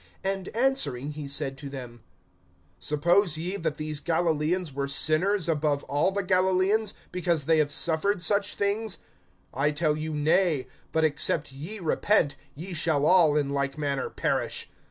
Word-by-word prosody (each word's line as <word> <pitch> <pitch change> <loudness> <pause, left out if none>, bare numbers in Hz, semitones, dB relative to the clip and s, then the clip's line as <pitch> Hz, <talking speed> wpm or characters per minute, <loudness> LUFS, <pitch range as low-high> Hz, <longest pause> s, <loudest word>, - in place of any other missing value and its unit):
(2)And 195 +1 -3
answering 235 - 0
he 150 -1 -7
said 135 -1 -2
to 140 -1 -7
them: 125 -4 -9 0.8
Suppose 170 +3 +2
ye 175 +4 0
that 160 -5 -3
these 155 -1 -2
Galilaeans 165 0 0
were 140 0 -2
sinners 165 +7 +1
above 150 -3 0
all 145 +6 0
the 200 +1 -2
Galilaeans, 190 +3 +2 0.2
because 170 -5 0
they 160 0 +3
have 145 -1 +1
suffered 170 +7 +1
such 200 +2 +1
things? 205 +1 -1 0.6
(3)I 145 +3 0
tell 150 -1 +2
you, 155 +1 -4
nay; 155 -1 +2 0.3
but, 160 - +1
except 150 -1 +1
ye 155 +11 -4
repent, 170 -2 +1 0.2
ye 175 +6 -7
shall 155 -3 +1
all 160 -4 +5
in 145 -2 0
like 140 0 -2
manner 140 -3 -2
perish. - - -2
160 Hz, 155 wpm, -26 LUFS, 145-185 Hz, 0.8 s, all